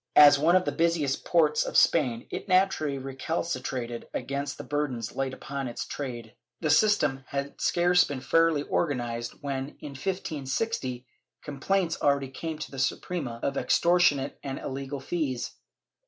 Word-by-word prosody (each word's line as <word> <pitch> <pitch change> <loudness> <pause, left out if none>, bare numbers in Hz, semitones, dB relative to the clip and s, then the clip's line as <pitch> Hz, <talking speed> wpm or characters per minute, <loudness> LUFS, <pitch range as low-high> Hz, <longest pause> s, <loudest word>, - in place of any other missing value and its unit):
As 145 -1 +9
one 165 +4 +4
of 185 0 +4
the - - 0
busiest 165 -5 0
ports 155 -3 +3
of - - -1
Spain, 125 -8 +3
it - - -5
naturally 185 -7 +2
recalcitrated 130 -3 -3
against 140 0 -3
the - - -7
burdens 135 -7 -3
laid 135 -1 -1
upon 135 0 -5
its 120 - -5
trade. 120 -5 -6 0.3
The 155 -3 +1
system 150 -8 +3
had 140 0 -4
scarce 175 0 +4
been 140 -2 -4
fairly 165 +1 +3
organized 120 -7 -1
when, 140 -1 -4
in 145 - -7
1560, 140 - -3 0.4
complaints 165 +4 -1
already 140 -2 +2
came 160 +4 -5
to 150 - -7
the 135 - -7
Suprema 130 -4 -2
of 140 0 -1
extortionate 170 -6 +3
and 135 -1 -4
illegal 135 +1 -5
fees. 135 -4 -2
140 Hz, 145 wpm, -27 LUFS, 130-165 Hz, 0.4 s, As